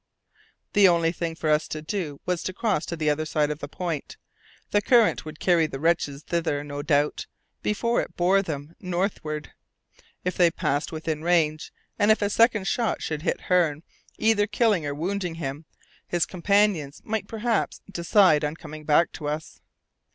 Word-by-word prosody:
The 200 -2 +7
only 170 -2 +3
thing 165 -1 -4
for 160 - -4
us 155 0 +2
to 155 - -5
do 155 -3 -4
was 180 -1 -1
to 185 - -4
cross 210 -7 -1
to 170 - -3
the 155 -2 +1
other 155 +1 -1
side 150 -1 0
of 150 - -5
the 145 - -6
point. 165 -1 -5 0.5
The 205 - +3
current 230 -4 +3
would 155 0 -9
carry 170 -3 +3
the 135 - -7
wretches 155 -3 0
thither, 160 -4 -1
no 145 0 -5
doubt, 145 0 +1 0.3
before 235 +3 +1
it - - -9
bore 185 +3 +4
them 155 -3 -6
northward. 175 -5 -3 0.7
If 180 - -2
they 175 -2 +5
passed 145 -2 -1
within 155 -1 -3
range, 160 -3 +1 0.3
and 205 0 +3
if 215 -1 +4
a 205 - 0
second 230 -3 +3
shot 235 -2 0
should 155 -1 -3
hit - - -1
Hearne, 165 -4 +1 0.3
either 215 -2 +3
killing 205 -7 +1
or 145 - -3
wounding 180 +2 -2
him, 150 -1 -5 0.4
his 175 -1 +1
companions 185 -5 +1
might 215 -2 -2
perhaps 225 0 -1
decide 170 -3 +4
on 150 +1 -1
coming 155 -1 -10
back 155 +3 +4
to 150 - -6
us. 150 +1 -5
170 Hz, 175 wpm, -25 LUFS, 150-195 Hz, 0.7 s, The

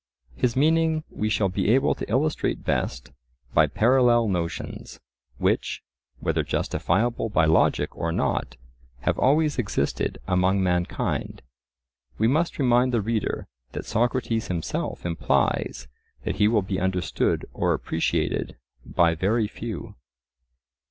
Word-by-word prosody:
His 120 - 0
meaning 160 +2 +2
we 105 - -2
shall 105 -2 +2
be 95 +2 -1
able 130 +4 +4
to - - -7
illustrate 145 +7 0
best 65 -2 -2 0.4
by - - +5
parallel 120 -1 +4
notions, 85 -3 -4 0.4
which, - - 0 0.4
whether - - 0
justifiable 115 +5 0
by 80 -6 +3
logic 80 +1 +2
or 85 +2 -2
not, 65 -5 -1 0.4
have - - 0
always 150 +2 +3
existed 95 - -1
among 95 +1 +2
mankind. 90 -1 -1 0.7
We 110 - +3
must 155 +7 +1
remind 125 -2 +3
the 120 -3 +1
reader 110 +1 -2 0.3
that - - -5
Socrates 115 -1 0
himself 85 -1 -3
implies 85 -1 0 0.4
that - - -2
he 105 +1 +4
will 110 -2 +2
be 95 0 -2
understood 95 -1 0
or - - +1
appreciated - - -1 0.3
by 85 -2 +2
very 105 +7 +1
few. 110 -2 -6
110 Hz, 125 wpm, -25 LUFS, 90-125 Hz, 0.7 s, by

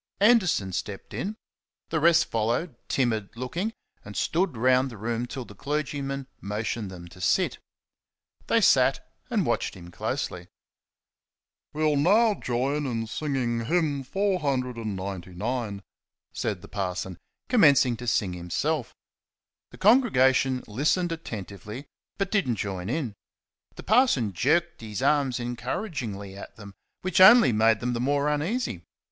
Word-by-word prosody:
Anderson 195 - +3
stepped 95 +2 -5
in; 210 +3 -3 0.5
the 160 - 0
rest 165 +1 +5
followed, 120 +7 -1
timid 110 -6 0
looking, 170 - -3 0.3
and 100 0 -9
stood 175 -5 0
round 130 +3 +3
the 115 - -10
room 115 +3 -2
till 130 0 -6
the 105 - -12
clergyman 140 +2 -3 0.2
motioned 105 +1 -3
them 85 -2 -10
to 90 +2 -14
sit. - - +1 0.9
They - - +3
sat - - +4 0.2
and - - +1
watched - - -1
him 85 -2 -11
closely. - - -3 1.2
"We'll 155 -1 +1
now 210 +9 +4
join 140 0 -1
in 115 -3 -2
singing 120 -3 -2
hymn 155 -2 +1
499," 115 - -2 0.5
said 100 -4 -3
the - - -10
parson, 95 -2 -4 0.3
commencing 140 - +5
to 120 - -7
sing 100 -4 +1
himself. 100 - -2 0.7
The - - -14
congregation 130 - +4
listened 155 - 0
attentively, 105 - -7 0.3
but 195 -1 -1
did 200 -10 +1
n't 115 - 0
join 95 -2 -4
in. 130 -5 -2 0.6
The - - -9
parson 210 - +3
jerked 170 - +1
his 110 +2 -5
arms 140 -3 +2
encouragingly 120 - -4
at 100 - -10
them, 100 -3 -11 0.3
which 185 0 +2
only 220 - +9
made 110 0 +3
them 125 0 -1
the 120 - -2
more 140 +2 +1
uneasy. 150 - -1
125 Hz, 130 wpm, -26 LUFS, 105-155 Hz, 1.2 s, only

